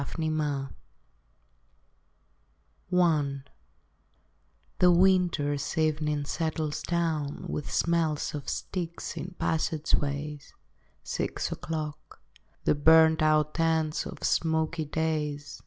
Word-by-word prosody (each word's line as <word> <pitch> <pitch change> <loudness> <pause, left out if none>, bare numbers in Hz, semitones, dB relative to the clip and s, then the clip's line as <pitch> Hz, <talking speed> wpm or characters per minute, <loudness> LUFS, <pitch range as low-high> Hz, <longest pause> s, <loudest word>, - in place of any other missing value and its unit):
Preludes 150 -3 -2 2.2
I 150 -6 +2 1.4
The 180 -1 +6
winter 175 -5 +3 0.2
evening 150 -2 +1
settles 155 -1 -2
down 160 -4 -1
With 150 - -4
smell 165 -3 +1 0.2
of 145 -3 -5
steaks 170 -2 -4
in 170 +3 -6
passageways. 150 -2 -1 0.5
Six - - -3
o'clock. 155 -2 -5 0.4
The - - +3
burnt 160 +2 +5
out 155 +1 +2
ends 160 -1 +1
of - - -9
smoky 160 0 +1
days. 150 -2 -2
155 Hz, 85 wpm, -28 LUFS, 150-165 Hz, 2.2 s, The